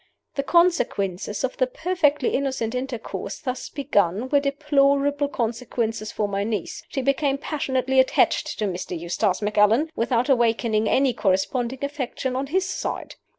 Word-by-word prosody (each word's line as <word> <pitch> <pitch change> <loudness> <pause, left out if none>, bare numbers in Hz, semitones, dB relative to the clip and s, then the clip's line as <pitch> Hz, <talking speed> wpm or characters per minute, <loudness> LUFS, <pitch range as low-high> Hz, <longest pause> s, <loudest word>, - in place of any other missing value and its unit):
"The 275 - -1
consequences 240 - +1
of 260 - -2
the 255 - +2
perfectly 295 -2 +1
innocent 260 -4 -1
intercourse 255 -2 -4
thus 260 -4 -4
begun 230 - 0
were 285 - +4
deplorable 280 0 +2
consequences 230 -3 -2
for 210 - -1
my 200 0 -1
niece. 210 -4 -3
She 270 - -3
became 275 +1 +1
passionately 265 -3 0
attached 260 - +2
to 215 - -1
Mr. 180 -2 -4
Eustace 180 +4 -1
Macallan, 210 +9 +3
without 235 +2 +1
awakening 230 -4 +2
any 265 -1 +3
corresponding 230 +8 0
affection 265 -2 -3
on 270 +2 -2
his 365 +5 0
side. - - -4
255 Hz, 140 wpm, -24 LUFS, 215-280 Hz, -, were